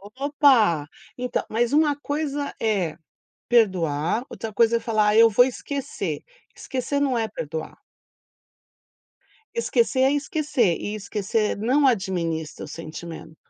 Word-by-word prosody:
Opa. 260 Hz, -, +3 dB, 0.3 s
Então, 250 Hz, 0 st, -2 dB
mas 235 Hz, +4 st, 0 dB
uma 300 Hz, -1 st, +4 dB
coisa 290 Hz, -1 st, -3 dB
é 195 Hz, -8 st, 0 dB, 0.5 s
perdoar, 185 Hz, -, +2 dB
outra 225 Hz, -1 st, -6 dB
coisa 230 Hz, +2 st, +3 dB
é -, -, -3 dB
falar 215 Hz, -2 st, +2 dB
eu 230 Hz, 0 st, +7 dB
vou 245 Hz, +4 st, +5 dB
esquecer, 275 Hz, +2 st, -4 dB, 0.3 s
esquecer 270 Hz, +2 st, -3 dB
não 270 Hz, -3 st, +1 dB
é 225 Hz, -1 st, 0 dB
perdoar. 160 Hz, -6 st, -6 dB, 1.8 s
Esquecer 460 Hz, -, +1 dB
é 265 Hz, +2 st, +4 dB
esquecer, 285 Hz, -, 0 dB
e 210 Hz, +1 st, -4 dB
esquecer 210 Hz, +1 st, -1 dB
não 260 Hz, +7 st, +2 dB
administra 170 Hz, -8 st, -1 dB
o -, -, -9 dB
sentimento. 165 Hz, 0 st, -9 dB
225 Hz, 120 wpm, -24 LUFS, 190-275 Hz, 1.8 s, eu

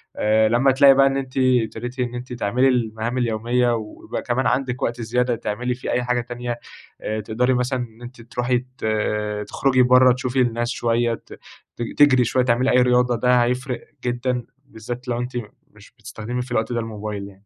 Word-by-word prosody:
آآ 110 Hz, +1 st, +3 dB
لما 125 Hz, +4 st, +4 dB
تلاقي 135 Hz, +1 st, +7 dB
بقى 135 Hz, 0 st, +5 dB
إن 135 Hz, 0 st, 0 dB
أنتِ 130 Hz, -1 st, -5 dB
ابتديتِ 125 Hz, -1 st, 0 dB
إن 125 Hz, -1 st, -2 dB
أنتِ 125 Hz, +1 st, -6 dB
تعملي 120 Hz, +3 st, +1 dB
المهام 115 Hz, -1 st, -1 dB
اليومية، 120 Hz, +1 st, +1 dB
ويبقى 110 Hz, -2 st, -6 dB
كمان 130 Hz, +2 st, 0 dB
عندِك 125 Hz, -1 st, -1 dB
وقت 120 Hz, +1 st, -2 dB
زيادة 125 Hz, +2 st, 0 dB
تعملي 120 Hz, +3 st, -3 dB
فيه 125 Hz, -, -5 dB
أي 125 Hz, -, 0 dB
حاجة 125 Hz, 0 st, 0 dB
تانية، 120 Hz, 0 st, -5 dB, 0.4 s
آآ 110 Hz, 0 st, -3 dB
تقدري 125 Hz, +5 st, 0 dB
مثلًا 125 Hz, +1 st, 0 dB
إن 120 Hz, -1 st, -8 dB
أنتِ 120 Hz, 0 st, -10 dB
تروحي 125 Hz, +1 st, -1 dB, 0.2 s
ت -, -, -6 dB, 0.6 s
تخرجي 130 Hz, -2 st, +2 dB
برّا، 125 Hz, 0 st, +6 dB
تشوفي 130 Hz, 0 st, -1 dB
الناس 120 Hz, -1 st, 0 dB
شوية، 120 Hz, -2 st, 0 dB
ت -, -, -10 dB, 0.4 s
ت -, -, -7 dB, 0.2 s
تجري 135 Hz, -4 st, +6 dB
شوية، 130 Hz, +3 st, +1 dB
تعملي 125 Hz, +2 st, +2 dB
أي 125 Hz, 0 st, +5 dB
رياضة، 125 Hz, 0 st, +3 dB
ده 125 Hz, +1 st, +3 dB
هيفرق 125 Hz, +1 st, -3 dB, 0.2 s
جدًا 125 Hz, 0 st, -1 dB, 0.2 s
بالذات 120 Hz, +1 st, -8 dB
لو 120 Hz, -1 st, -1 dB
أنتِ 125 Hz, +1 st, -5 dB, 0.4 s
مش 105 Hz, -1 st, -18 dB
بتستخدمي 115 Hz, +1 st, -5 dB
في 125 Hz, 0 st, -9 dB
الوقت 110 Hz, 0 st, 0 dB
ده 120 Hz, -, 0 dB
الموبايل 105 Hz, -3 st, -5 dB
يعني. 100 Hz, 0 st, -17 dB
120 Hz, 185 wpm, -22 LUFS, 115-125 Hz, 0.6 s, تلاقي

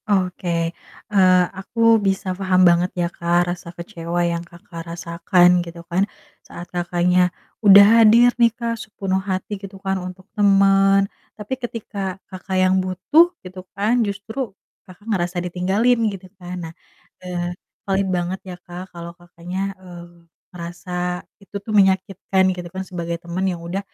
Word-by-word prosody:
Oke, 185 Hz, -2 st, 0 dB, 0.6 s
eee, 185 Hz, -2 st, +5 dB, 0.2 s
aku 200 Hz, +4 st, -8 dB, 0.2 s
bisa 195 Hz, -1 st, -1 dB
paham 185 Hz, -1 st, +1 dB
banget 175 Hz, +1 st, +2 dB
ya, -, -, +2 dB
Kak, 175 Hz, +1 st, +1 dB
rasa 175 Hz, -1 st, -10 dB
kecewa 170 Hz, -1 st, -4 dB
yang 170 Hz, 0 st, -1 dB
Kakak 170 Hz, 0 st, -11 dB
rasakan, 175 Hz, +1 st, +3 dB
gitu 170 Hz, 0 st, -10 dB
kan, 175 Hz, +3 st, +1 dB, 0.4 s
saat 175 Hz, -, -10 dB
Kakaknya 180 Hz, +1 st, +2 dB, 0.3 s
udah 200 Hz, -1 st, +9 dB, 0.2 s
hadir 235 Hz, +3 st, +6 dB
nih, 235 Hz, -, +7 dB
Kak, 230 Hz, -1 st, -3 dB
sepenuh 195 Hz, -3 st, -2 dB
hati, 190 Hz, +2 st, -3 dB
gitu 195 Hz, -1 st, -9 dB
kan, 190 Hz, -1 st, -1 dB
untuk 185 Hz, +1 st, -9 dB
temen, 195 Hz, -1 st, +4 dB, 0.3 s
tapi 210 Hz, +4 st, -5 dB
ketika 205 Hz, -5 st, -5 dB, 0.2 s
Kakak 185 Hz, 0 st, -4 dB
yang 185 Hz, 0 st, +3 dB
butuh, 185 Hz, -, +3 dB, 0.2 s
gitu 185 Hz, 0 st, -8 dB, 0.2 s
kan, 225 Hz, +5 st, +2 dB
justru 220 Hz, +4 st, -3 dB, 0.4 s
Kakak 185 Hz, +3 st, -15 dB
ngerasa 180 Hz, -5 st, -1 dB
ditinggalin, 195 Hz, +7 st, +1 dB
gitu 195 Hz, -2 st, -8 dB, 0.2 s
kan. 180 Hz, +1 st, -6 dB
Nah, 160 Hz, -, -9 dB, 0.5 s
eee, 175 Hz, -1 st, -4 dB, 0.3 s
paling 195 Hz, 0 st, 0 dB
banget 175 Hz, +2 st, -2 dB
ya, 180 Hz, -, -6 dB
Kak, 180 Hz, +2 st, -8 dB
kalau 170 Hz, 0 st, -8 dB
Kakaknya, 180 Hz, +2 st, -6 dB
eee, 175 Hz, -2 st, -13 dB, 0.3 s
ngerasa 180 Hz, 0 st, -5 dB, 0.2 s
itu 195 Hz, 0 st, -18 dB
tuh 215 Hz, -, -6 dB
menyakitkan, 190 Hz, 0 st, +2 dB
gitu 180 Hz, -1 st, -6 dB
kan, 190 Hz, -, -3 dB
sebagai 170 Hz, -2 st, -4 dB
teman 175 Hz, +2 st, -3 dB
yang 175 Hz, -2 st, -3 dB
udah, 175 Hz, +3 st, -3 dB
185 Hz, 150 wpm, -21 LUFS, 175-195 Hz, 0.6 s, udah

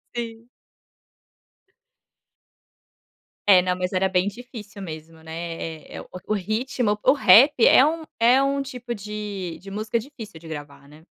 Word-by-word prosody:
Sim. 230 Hz, 0 st, -6 dB, 3.0 s
É, 185 Hz, -2 st, +8 dB
não, 180 Hz, 0 st, -1 dB
mas 180 Hz, +1 st, -3 dB
era 190 Hz, +1 st, +1 dB
bem 185 Hz, +1 st, +1 dB
difícil 215 Hz, -2 st, -9 dB
mesmo, 160 Hz, -1 st, -9 dB
né. 165 Hz, -1 st, -6 dB
Eh, -, -, -8 dB
o -, -, -14 dB, 0.2 s
o 215 Hz, -, 0 dB
ritmo, 220 Hz, +3 st, -1 dB
o 210 Hz, -, -1 dB
p 250 Hz, -, 0 dB
o -, -, +7 dB
rap 255 Hz, +1 st, +6 dB
é 265 Hz, -, +7 dB
um 320 Hz, +1 st, -1 dB, 0.2 s
é 250 Hz, +4 st, +5 dB
um 275 Hz, 0 st, 0 dB
tipo 250 Hz, -3 st, -6 dB
de 205 Hz, -4 st, -6 dB
de 195 Hz, 0 st, -11 dB
música 215 Hz, +3 st, -2 dB
difícil 230 Hz, -, -9 dB
de 160 Hz, 0 st, -12 dB
gravar, 145 Hz, -2 st, -9 dB
né. 155 Hz, +2 st, -17 dB
210 Hz, 155 wpm, -23 LUFS, 175-240 Hz, 3.0 s, É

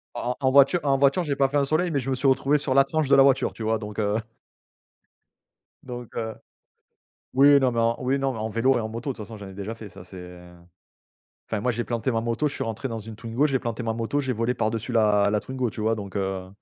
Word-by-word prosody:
En 120 Hz, +1 st, -2 dB
en -, -, -4 dB
en 130 Hz, -1 st, +2 dB
voiture 140 Hz, +6 st, +5 dB
en 140 Hz, -2 st, +2 dB
voiture 140 Hz, +6 st, +3 dB
j'ai 145 Hz, -4 st, -2 dB
pas 135 Hz, 0 st, +3 dB
fait 145 Hz, -, 0 dB
un 140 Hz, -, +2 dB
soleil 160 Hz, +5 st, +1 dB
mais 145 Hz, -, +1 dB
je 135 Hz, +1 st, -4 dB
me 130 Hz, -, +1 dB
suis 130 Hz, +2 st, 0 dB
retrouvé 135 Hz, +2 st, +3 dB
sur 140 Hz, -2 st, 0 dB
la 135 Hz, +1 st, +6 dB
tranche 155 Hz, +1 st, -1 dB
de 140 Hz, -, +6 dB
la 135 Hz, -, +7 dB
voiture, 135 Hz, -1 st, +2 dB
tu 115 Hz, -, -7 dB
vois, 110 Hz, +1 st, +1 dB
donc 105 Hz, -1 st, -7 dB
heu 105 Hz, -1 st, 0 dB, 1.7 s
donc, 125 Hz, -2 st, -8 dB
heu 110 Hz, -1 st, -3 dB, 1.0 s
oui 140 Hz, +2 st, +7 dB
non 130 Hz, -2 st, +2 dB
mais 115 Hz, -, 0 dB
en 115 Hz, 0 st, +2 dB
oui 130 Hz, +2 st, 0 dB
non 135 Hz, 0 st, 0 dB
mais 115 Hz, -, -7 dB
en 110 Hz, +1 st, -2 dB
vélo 115 Hz, +4 st, +2 dB
et -, -, +1 dB
en 110 Hz, -, -3 dB
moto, 115 Hz, +5 st, -5 dB
de -, -, -15 dB
toute 110 Hz, -, -7 dB
façon, 110 Hz, -, -9 dB
j'en 100 Hz, -2 st, -9 dB
ai 95 Hz, -, -11 dB
déjà, 100 Hz, +3 st, -5 dB
ça 105 Hz, -6 st, -11 dB
c'est, 95 Hz, +1 st, -12 dB
heu 90 Hz, 0 st, -12 dB, 1.0 s
enfin, 110 Hz, -, -2 dB
moi 125 Hz, -, 0 dB
j'ai 120 Hz, +1 st, -3 dB
planté 120 Hz, +2 st, -2 dB
ma 115 Hz, -2 st, 0 dB
moto, 120 Hz, +6 st, 0 dB
je 145 Hz, -, -7 dB
suis -, -, -3 dB
rentré 115 Hz, +4 st, -4 dB
dans 115 Hz, -2 st, -4 dB
une 110 Hz, +1 st, -9 dB
Twingo, 115 Hz, +5 st, 0 dB
j'ai 135 Hz, -3 st, 0 dB
planté 120 Hz, 0 st, -4 dB
ma 115 Hz, -1 st, -1 dB
moto, 115 Hz, +5 st, -1 dB
j'ai 130 Hz, -1 st, -1 dB
volé 115 Hz, +2 st, -1 dB
par 110 Hz, -, 0 dB
dessus 115 Hz, +2 st, -4 dB
la 105 Hz, -3 st, +3 dB
la 105 Hz, -, +1 dB
Twingo, 130 Hz, 0 st, -3 dB
tu 110 Hz, -, -8 dB
vois, 110 Hz, +1 st, +2 dB
donc, 100 Hz, -2 st, -7 dB
heu 95 Hz, -1 st, -3 dB
120 Hz, 275 wpm, -25 LUFS, 110-135 Hz, 1.7 s, la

